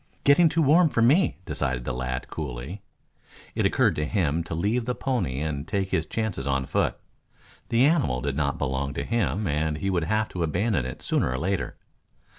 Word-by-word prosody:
"Getting 155 +4 +6
too 165 +1 +1
warm 160 +4 +5
for 115 - +2
me," 150 +11 +4
decided 65 -3 -2
the 65 - -2
lad 65 0 -3
coolly. 75 - -6 0.7
It - - +2
occurred - - +2
to 75 - 0
him 85 -5 0
to 80 - -4
leave 105 +8 0
the 125 0 -1
pony 100 - -1
and 75 -1 -3
take 100 -1 -1
his 80 - 0
chances 100 - -3
on 70 -1 0
foot. - - 0 0.7
The 120 +2 +4
animal 145 - +2
did 70 +1 -2
not 70 -1 0
belong 70 -1 -2
to - - -2
him 105 - 0
and 75 -1 0
he 95 +4 -1
would 85 -3 0
have 110 +4 +1
to 90 - -5
abandon 85 - 0
it 65 - -8
sooner - - +1
or 65 - -1
later. 95 +6 -2
85 Hz, 195 wpm, -26 LUFS, 70-115 Hz, 0.7 s, Getting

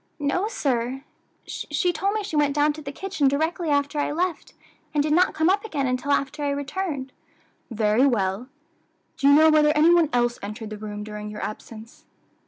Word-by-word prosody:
"No, 310 +7 0
sir; 265 - -2 0.4
she 360 -3 -2
told 395 +4 -1
me 430 - -1
she 385 - -5
went 290 -1 +2
down 295 0 +3
to 310 - -9
the 280 -2 -6
kitchen 320 -3 -1
directly 320 +4 0
after 285 +1 0
I 290 - 0
left, 345 +2 -2 0.4
and 290 - +3
did 300 0 0
not 360 +3 +3
come 315 +1 +2
up 395 +2 +2
again 300 -11 -2
until 255 +2 -1
after 280 +1 -1
I 285 - 0
returned." 280 -1 -3 0.6
"Very 225 +3 +2
well; 205 -1 -1 0.7
do 275 - +2
you 285 - +7
know 315 +1 +6
whether 305 -1 +5
any 325 +3 +6
one 335 -4 +4
else 240 -1 +1
entered 215 +2 -7
the 215 - -6
room 210 -1 -6
during 210 0 -7
your 210 - -7
absence?" 220 +1 -9
285 Hz, 190 wpm, -24 LUFS, 240-315 Hz, 0.7 s, you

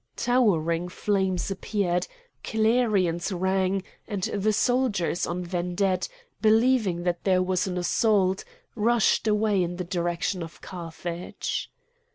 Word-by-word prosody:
Towering 180 -9 +2
flames 190 -1 0
appeared; 185 -2 -1 0.4
clarions 215 -6 +1
rang; 190 +1 0 0.2
and 200 -4 -4
the 205 +3 +1
soldiers 215 -6 +1
on 180 0 -3
vedette, 180 +1 0 0.3
believing 220 -5 +3
that 175 -1 -1
there 185 -2 +3
was 185 0 0
an 180 -1 -3
assault, 190 +1 +2 0.3
rushed 230 -1 +2
away 210 -2 +2
in 175 0 -1
the 180 - -3
direction 175 +1 -2
of 165 0 -8
Carthage. 175 0 -5
190 Hz, 115 wpm, -26 LUFS, 175-210 Hz, 0.4 s, believing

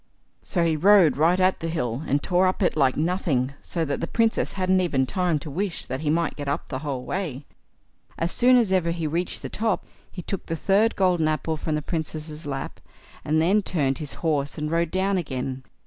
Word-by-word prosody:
So 175 - -1
he 165 -1 +2
rode 185 0 +5
right 165 +5 +3
at 185 0 +3
the 165 - -3
hill, 135 -7 -2
and 140 +1 +1
tore 180 +1 +3
up 185 +2 0
it - - +2
like 135 -4 +2
nothing, 155 -6 0
so 165 -2 -2
that 145 - -2
the 165 - -2
Princess 225 +2 +1
hadn't 185 0 +2
even 140 -7 +1
time 180 +2 0
to 150 +1 -7
wish 185 +3 -2
that 130 +1 -4
he 150 0 -2
might 165 0 +1
get 145 -1 -6
up 140 - -2
the 130 - -3
whole 135 -4 -4
way. 155 -8 -4 0.7
As 165 +1 -1
soon 250 +1 +5
as 225 -6 +2
ever 180 -3 +2
he 170 -1 -2
reached 170 +4 -2
the - - -3
top, 220 -2 -1 0.3
he 180 - -7
took 195 - -5
the 165 - -2
third 200 +7 +2
golden 180 -4 +2
apple 155 +1 -1
from 155 0 -2
the 150 - -2
Princess' 155 -1 -5
lap, 135 -1 -5 0.4
and 155 +1 +1
then 190 +6 +3
turned 140 -9 0
his 150 -3 -6
horse 145 -3 0
and 150 0 -3
rode 170 0 +1
down 190 +2 +1
again. 130 -4 -4
165 Hz, 215 wpm, -24 LUFS, 145-185 Hz, 0.7 s, rode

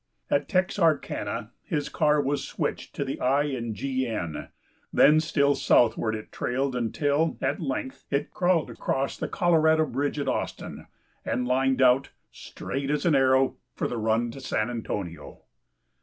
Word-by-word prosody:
At 145 - +1
Texarkana 155 - 0
his 150 -4 -2
car 150 -1 +2
was 145 0 0
switched - - -4
to - - -2
the - - -5
I. 140 +3 +3
and 120 -6 -3
G. 130 +3 -2
N. 85 -9 -4 0.4
Then 155 +1 +6
still 145 -3 +2
southward 115 -4 +3
it 110 - -8
trailed 130 +1 -1
until, 145 +6 0
at 135 +5 -1
length, 130 -3 -4
it 140 +1 -1
crawled 175 -3 +1
across 135 +1 -2
the - - -4
Colorado 160 -3 +3
bridge 145 0 -2
at 140 -2 -2
Austin, - - -4 0.4
and 125 0 -1
lined 130 +1 +2
out, 130 +1 +4 0.2
straight 135 0 -5
as 150 +3 0
an 170 - +4
arrow, 130 -1 +3 0.2
for - - -1
the 120 - -4
run 115 +2 +1
to 135 - -10
San 110 -2 -1
Antonio. 85 -10 -6
135 Hz, 155 wpm, -26 LUFS, 120-150 Hz, 0.4 s, Then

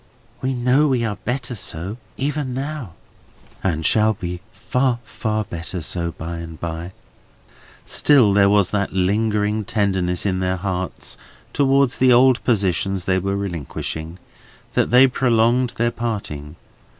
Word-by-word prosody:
"We 130 0 -1
know 125 +5 +3
we 125 -4 +1
are 105 -2 -3
better 125 0 -3
so, 95 0 -4 0.2
even 140 -2 -2
now?" 135 - -5 0.7
"And 80 -4 -1
shall 110 +3 +3
be 90 -1 -5
far, 120 +3 0
far 110 -1 -2
better 85 -1 -6
so 85 +1 -2
by 85 +1 -6
and 80 -1 -8
by." 85 +2 -5 0.9
Still 130 -9 +4
there 100 0 +5
was 100 -2 +3
that 100 -2 -1
lingering 105 +2 +1
tenderness 95 -5 0
in 95 -2 0
their 95 0 0
hearts 95 -1 -4 0.4
towards 135 -2 +2
the 130 0 +5
old 125 +1 +5
positions 95 -4 0
they 95 0 +2
were 100 +2 -1
relinquishing, 85 -2 -4 0.6
that - - +2
they 125 +2 +7
prolonged 125 -1 +2
their 120 0 +1
parting. 90 -12 -4
105 Hz, 140 wpm, -21 LUFS, 90-125 Hz, 0.9 s, they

